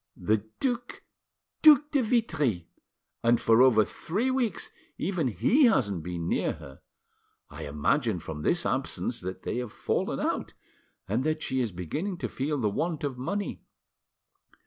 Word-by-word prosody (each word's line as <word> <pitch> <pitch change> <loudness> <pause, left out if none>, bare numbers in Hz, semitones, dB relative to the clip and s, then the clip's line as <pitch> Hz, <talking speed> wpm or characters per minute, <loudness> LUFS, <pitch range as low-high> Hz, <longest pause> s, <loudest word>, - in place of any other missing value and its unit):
The 105 +3 +1 0.2
Duc 245 -2 -2 0.6
Duc 300 -1 +7
de 280 - +3
Vitry; 160 - 0 0.6
and 120 0 +4
for 115 +1 +4
over 115 -5 +6
three 220 +10 -2
weeks 245 -7 -1 0.3
even 175 -5 -1
he 255 - +3
hasn't 100 - +2
been 85 0 -4
near - - 0
her. 65 - -12 0.7
I - - -7
imagine 100 - +1
from 80 -2 -7
this - - +1
absence - - -1
that 95 +1 -6
they - - -2
have 125 -3 -4
fallen - - -1
out, - - -2 0.5
and 110 +7 0
that 155 +1 -1
she 130 0 0
is 115 -4 -1
beginning 150 - -4
to - - -4
feel 145 +3 -2
the 115 -6 +1
want 160 - -2
of 135 -3 -3
money." 200 +10 -3
130 Hz, 150 wpm, -28 LUFS, -, 0.7 s, Duc